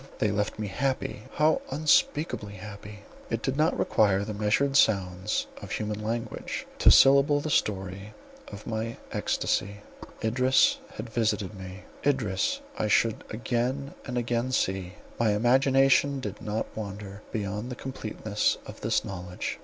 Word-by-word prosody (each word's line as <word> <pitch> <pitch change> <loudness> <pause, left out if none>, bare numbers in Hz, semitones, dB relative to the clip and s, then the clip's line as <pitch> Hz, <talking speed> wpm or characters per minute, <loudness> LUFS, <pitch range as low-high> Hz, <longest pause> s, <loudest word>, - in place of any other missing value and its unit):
They 105 - +1
left 105 0 -1
me 105 - -3
happy—how 135 +6 0
unspeakably 145 -5 +1
happy. 105 +1 -9 0.3
It 115 -1 -2
did 135 - 0
not 155 +3 +2
require 100 -2 +2
the 110 - -4
measured 105 +7 +1
sounds 95 -5 +2 0.2
of - - -8
human 105 0 -3
language 115 +2 -3
to - - +7
syllable 140 +2 +6
the 155 +1 -3
story 100 -2 -1 0.3
of 105 0 -10
my 115 0 -3
extasy. 100 0 -1 0.4
Idris 130 +4 +3 0.2
had 110 - -6
visited 110 -3 0
me; 95 -1 -9 0.2
Idris 125 -10 0 0.2
I 105 - +1
should 110 +1 +2
again 125 +5 -2
and 125 -2 -4
again 120 +1 0
see—my 95 +1 -1
imagination 135 +4 +4
did 105 -6 -6
not 105 +1 -2
wander 100 -1 -6
beyond 105 +2 -3
the 125 - -5
completeness 110 -5 -2
of - - -10
this - - +1
knowledge. 90 -2 -5
110 Hz, 135 wpm, -27 LUFS, 100-130 Hz, 0.4 s, to